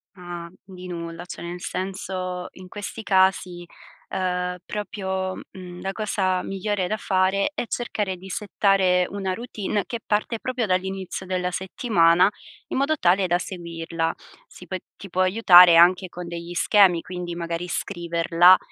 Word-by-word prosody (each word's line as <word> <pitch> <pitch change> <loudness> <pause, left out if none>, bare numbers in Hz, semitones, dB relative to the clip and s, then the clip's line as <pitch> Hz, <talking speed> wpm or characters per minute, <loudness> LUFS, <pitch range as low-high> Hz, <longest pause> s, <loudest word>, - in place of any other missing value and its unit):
Ah, 175 -2 -8
di 185 -1 -10
nulla. 170 0 -6
Cioè, 175 - -8
nel 175 +1 -6
senso, 185 -1 -4
in 185 0 -12
questi 205 +3 -7
casi, 190 -3 +2 0.5
uhm, 180 -1 -1
proprio, 190 -3 -3 0.2
mhmm, 180 -2 -10
la 190 +1 -2
cosa 195 -3 0
migliore 195 -1 -2
da 215 - -1
fare 190 +4 +1
è 245 - -3
cercare 210 -6 -2
di 185 +2 -12
settare 190 -2 +2
una 195 -2 -2
routine 210 -2 -3
che 235 - -5
parte 215 +2 -1
proprio 255 -1 -2
dall'inizio 190 0 -2
della 180 -1 -1
settimana, 180 -2 +3 0.4
in - - -3
modo 285 +3 +1
tale 185 -1 +3
da 175 0 +2
seguirla. 165 -3 -3 0.4
Si 180 - -13
può 185 +1 -4 0.2
ti 195 - -10
può 185 +2 0
aiutare 185 -3 +8
anche 180 +2 +5
con 175 0 -8
degli 170 0 -6
schemi, 185 -3 +4
quindi 180 -1 -6
magari 170 +1 -4
scriverla 170 0 +3
185 Hz, 145 wpm, -24 LUFS, 175-195 Hz, 0.5 s, aiutare